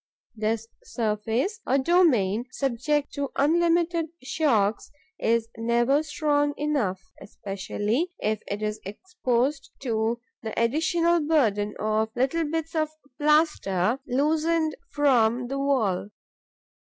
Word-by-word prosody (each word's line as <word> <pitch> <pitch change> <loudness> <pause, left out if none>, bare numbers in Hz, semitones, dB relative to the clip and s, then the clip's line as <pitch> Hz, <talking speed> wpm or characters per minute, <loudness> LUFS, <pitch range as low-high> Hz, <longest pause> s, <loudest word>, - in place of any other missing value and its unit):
This 220 +1 -1 0.2
surface, 235 - -1
a 265 - +3
domain 260 - +3
subject 275 +3 -1
to 280 -1 -2
unlimited 335 +2 +2 0.2
shocks, 230 -8 +1 0.3
is 230 0 +1
never 235 +5 +2
strong 290 -1 0
enough, 275 -11 0 0.2
especially 205 - -3
as 215 0 0
it 205 +1 -4
is 210 0 -2
exposed 270 - -2
to 230 -2 0 0.2
the 220 -1 -4
additional 330 +8 +2
burden 225 -10 +1
of 215 +1 0
little 270 +7 +1
bits 325 +1 -3
of 310 -2 0 0.3
plaster 285 - +2
loosened 310 +4 +1 0.2
from 245 -5 +2
the 275 +1 -2
wall. 225 -9 0
265 Hz, 105 wpm, -26 LUFS, 220-310 Hz, 0.3 s, a